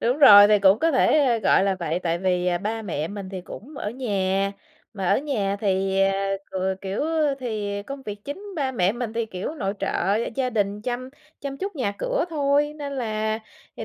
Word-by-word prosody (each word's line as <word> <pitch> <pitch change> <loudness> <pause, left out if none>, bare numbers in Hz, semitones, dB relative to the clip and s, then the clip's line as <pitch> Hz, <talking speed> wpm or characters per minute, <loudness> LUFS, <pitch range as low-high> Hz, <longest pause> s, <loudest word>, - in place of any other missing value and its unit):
Đúng 245 +4 +1
rồi, 205 -7 +10
thì 210 - +5
cũng 195 +2 +5
có 330 +3 +2
thể 260 -3 +3
gọi 195 - +4
là 195 -1 +1
vậy, 165 +1 -1
tại 170 -1 -1
vì, 180 -1 0
à, 175 -1 +1
ba 220 +4 -3
mẹ 160 -5 -3
mình 200 -2 -7
thì 190 - -5
cũng 275 +10 -10
ở 210 - -3
nhà, 195 -5 -1 0.4
mà 190 -3 -2
ở - - +4
nhà 215 -9 -1
thì, 195 -1 +1
à, 195 0 +1 0.2
ừ, 190 0 -1
kiểu, 195 +7 -2 0.4
thì 205 -4 -3
công 275 +5 -8
việc 205 -2 -7
chính 290 +9 -6
ba 270 -4 -1
mẹ 190 -4 +2
mình 240 -1 -4
thì, 230 0 -1
kiểu, 195 +8 -5
nội 200 -9 -2
trợ 195 +4 0 0.2
gia 255 -2 0
đình, 205 -2 -1
chăm 250 +2 -3 0.3
chăm 275 -1 -5
chút 390 -2 -4
nhà 245 -7 -1
cửa - - 0
thôi. 290 0 +1
Nên 285 -2 -5
là 220 -3 -1 0.4
thì - - -5
210 Hz, 210 wpm, -24 LUFS, 195-260 Hz, 0.4 s, rồi